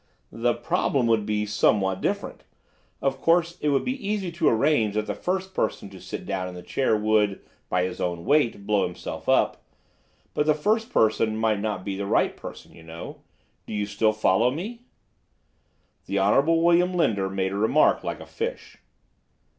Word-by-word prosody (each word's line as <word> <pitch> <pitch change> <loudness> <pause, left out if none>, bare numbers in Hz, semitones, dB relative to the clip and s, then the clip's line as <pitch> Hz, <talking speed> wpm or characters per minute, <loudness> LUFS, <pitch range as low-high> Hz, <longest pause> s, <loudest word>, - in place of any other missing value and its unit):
"—the 120 +1 0
problem 135 -4 0
would 110 -2 +2
be 105 0 0
somewhat 100 -2 +1
different. - - -3 0.6
Of 135 -1 0
course, 170 +1 +2
it 150 - +1
would 140 -1 +1
be 260 +2 -3
easy 200 -4 -1
to 170 - +2
arrange 115 -3 +2
that 110 0 0
the - - -3
first 190 +1 -3
person 105 - -2
to 95 - -12
sit - - -7
down 95 -2 -2
in 90 - -8
the 90 - -9
chair 130 -5 +1
would, 105 -2 +2 0.3
by 90 0 +1
his 90 0 -4
own 85 -1 -2
weight, 130 -9 +2
blow 105 -1 +2
himself 90 - -7
up. - - +2 0.7
But 150 - 0
the 155 - +4
first 220 +9 0
person 110 0 +2
might 110 -2 +1
not 105 -3 -3
be 100 -2 -3
the 100 0 -4
right - - +2
person, - - -10
you - - -15
know. 80 0 -9 0.5
Do - - -5
you 105 0 0
still 105 +2 +1
follow 110 +2 +2
me?" 215 - -6 1.2
The 100 - -1
Honorable 140 +12 +3
William 175 +1 +3
Linder 100 - +1
made 95 0 -1
a - - -4
remark 110 +9 +3
like - - -4
a - - -9
fish. 475 +2 -6
110 Hz, 180 wpm, -25 LUFS, 100-155 Hz, 1.2 s, the